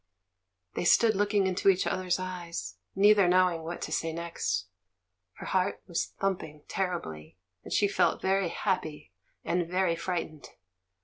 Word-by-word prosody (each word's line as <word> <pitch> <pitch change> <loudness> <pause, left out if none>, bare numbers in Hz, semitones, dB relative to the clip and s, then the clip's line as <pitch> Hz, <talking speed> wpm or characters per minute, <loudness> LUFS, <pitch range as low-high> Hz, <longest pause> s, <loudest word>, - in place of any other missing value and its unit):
They - - -2
stood 220 +5 +5
looking 205 0 +2
into 190 +1 +2
each 190 -1 +3
other's 185 -1 0
eyes, 175 - -5 0.2
neither 205 -1 +6
knowing 180 -2 +3
what 165 +2 -5
to - - -5
say 165 +1 -1
next. 160 - -2 0.7
Her - - -10
heart 190 +1 0
was 170 -3 -2
thumping 160 -6 -2
terribly, 95 - -4 0.3
and - - -10
she 205 - +3
felt 200 - +2
very 190 -1 +1
happy 160 - -2 0.3
and 175 -1 0
very 180 -1 +1
frightened. 170 -3 -4
180 Hz, 140 wpm, -29 LUFS, 165-190 Hz, 0.7 s, neither